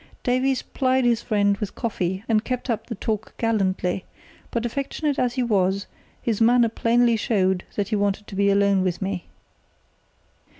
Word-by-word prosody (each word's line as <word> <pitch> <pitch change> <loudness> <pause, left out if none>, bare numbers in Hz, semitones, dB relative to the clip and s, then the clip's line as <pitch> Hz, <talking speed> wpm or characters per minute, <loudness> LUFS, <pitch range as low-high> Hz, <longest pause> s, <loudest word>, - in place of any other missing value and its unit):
Davies 255 +1 +1
plied 260 -1 +1
his 235 -1 +3
friend 205 -2 +1
with 205 -1 -5
coffee, 190 -5 -2
and 220 -1 +2
kept 250 0 -2
up 225 - -3
the - - -4
talk 215 +2 -4
gallantly; 190 -5 0 0.5
but 235 0 -2
affectionate 280 +4 -2
as 245 0 0
he 255 - +1
was, 195 -3 +1 0.4
his 225 -2 -1
manner 235 0 +5
plainly 235 +1 +3
showed 190 -4 +1
that 200 -2 -1
he 220 - +1
wanted 205 0 0
to - - -12
be 200 +1 +3
alone 200 -1 +3
with 180 -2 -1
me. 190 -2 -3
215 Hz, 165 wpm, -24 LUFS, 195-240 Hz, 0.5 s, manner